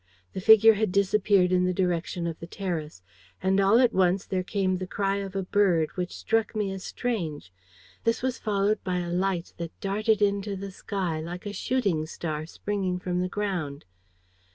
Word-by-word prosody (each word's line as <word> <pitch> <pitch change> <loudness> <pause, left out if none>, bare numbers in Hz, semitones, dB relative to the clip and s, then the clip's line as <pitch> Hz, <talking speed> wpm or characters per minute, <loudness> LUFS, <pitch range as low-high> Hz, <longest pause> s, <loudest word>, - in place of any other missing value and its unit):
The 190 - -4
figure 220 +2 +8
had 215 -2 0
disappeared 200 -1 +3
in 180 0 +3
the 180 0 0
direction 175 -1 -1
of 165 -1 -4
the 165 - -8
terrace. 165 - -5 0.4
And 190 +1 +3
all 195 +3 +5
at 245 -2 +4
once 185 0 +2
there 185 -1 -1
came 185 0 0
the 185 0 -5
cry 195 +1 0
of 195 -1 -5
a 195 - -1
bird, 185 -5 +2
which 180 -1 -4
struck 225 -1 0
me 210 -2 -1
as 190 -1 -6
strange. 160 - -3 0.5
This 230 +1 0
was 260 -1 -1
followed 205 0 0
by 180 -2 -1
a 175 -1 -3
light 180 -1 -1
that 170 -1 -7
darted 215 +2 +1
into 200 0 +1
the 195 +1 -6
sky, 185 -4 -3
like 175 +4 -7
a 205 - -4
shooting 200 -12 0
star 155 -1 -4
springing 190 0 -2
from 180 0 -2
the 185 - -1
ground. 180 -9 -3
190 Hz, 185 wpm, -27 LUFS, 175-205 Hz, 0.5 s, figure